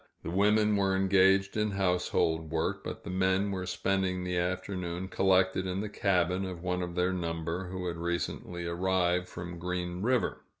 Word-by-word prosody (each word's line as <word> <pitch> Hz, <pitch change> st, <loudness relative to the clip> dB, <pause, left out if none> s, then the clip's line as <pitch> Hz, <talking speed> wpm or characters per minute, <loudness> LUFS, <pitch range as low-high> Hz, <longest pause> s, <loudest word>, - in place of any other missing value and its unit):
The -, -, -4 dB
women 105 Hz, +3 st, +3 dB
were 95 Hz, -1 st, +2 dB
engaged 95 Hz, 0 st, +4 dB
in 105 Hz, 0 st, +1 dB
household 90 Hz, -4 st, +1 dB
work, 80 Hz, 0 st, -1 dB
but -, -, -6 dB
the -, -, -5 dB
men 95 Hz, +2 st, +1 dB
were 95 Hz, -1 st, -3 dB
spending 95 Hz, -1 st, 0 dB
the 90 Hz, 0 st, -2 dB
afternoon 90 Hz, 0 st, -2 dB
collected 95 Hz, -1 st, +2 dB
in 90 Hz, +1 st, -2 dB
the 105 Hz, +1 st, -3 dB
cabin 90 Hz, -2 st, +1 dB
of 90 Hz, -2 st, -6 dB
one 90 Hz, 0 st, -1 dB
of 85 Hz, -1 st, -4 dB
their 90 Hz, +1 st, +1 dB
number, 85 Hz, +1 st, -3 dB
who 90 Hz, 0 st, -5 dB
had 85 Hz, -1 st, -3 dB
recently 85 Hz, 0 st, -3 dB
arrived 90 Hz, +1 st, +1 dB
from 85 Hz, 0 st, -7 dB
Green 90 Hz, 0 st, -3 dB
River. 125 Hz, +4 st, +1 dB
90 Hz, 170 wpm, -30 LUFS, 90-95 Hz, -, engaged